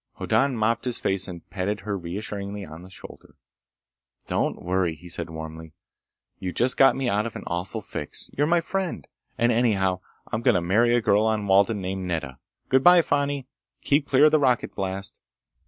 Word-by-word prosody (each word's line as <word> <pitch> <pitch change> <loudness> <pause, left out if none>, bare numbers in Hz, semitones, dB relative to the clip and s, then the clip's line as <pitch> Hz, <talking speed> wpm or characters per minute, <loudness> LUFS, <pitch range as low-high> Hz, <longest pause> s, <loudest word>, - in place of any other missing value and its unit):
Hoddan 135 -2 +1
mopped 115 +3 +1
his 125 -2 -2
face 95 0 0
and 85 -3 -9
patted 100 +2 -2
her 105 -1 -3
reassuringly 100 +2 -5
on 80 +1 -10
the 90 - -12
shoulder. 95 - -13 0.9
"Don't - - -1
worry!" 90 -2 0
he 90 +3 -14
said 85 -1 -3
warmly. 80 0 -8 0.7
"You 90 - -3
just 125 +2 +1
got 135 - +5
me 135 -2 -2
out 105 0 +1
of 115 - -9
an - - -6
awful 85 +2 -3
fix! - - -5
You're 145 +2 +1
my 170 +1 +3
friend! 180 - -3 0.3
And 120 +1 +3
anyhow 100 -6 +2 0.3
I'm 110 - -1
going - - +3
to - - +3
marry 115 +7 +3
a 120 - +2
girl 105 0 +3
on 110 -2 0
Walden, 100 +2 +3
named 95 0 -4
Nedda. 75 -7 -4 0.3
Good 130 0 +3
by, 175 -1 +7
Fani! 145 -2 0 0.4
Keep 145 0 +2
clear 140 +2 +5
of 155 - +6
the 155 - +4
rocket 125 -4 +1
blast." 95 0 -4
100 Hz, 190 wpm, -25 LUFS, 90-125 Hz, 0.9 s, by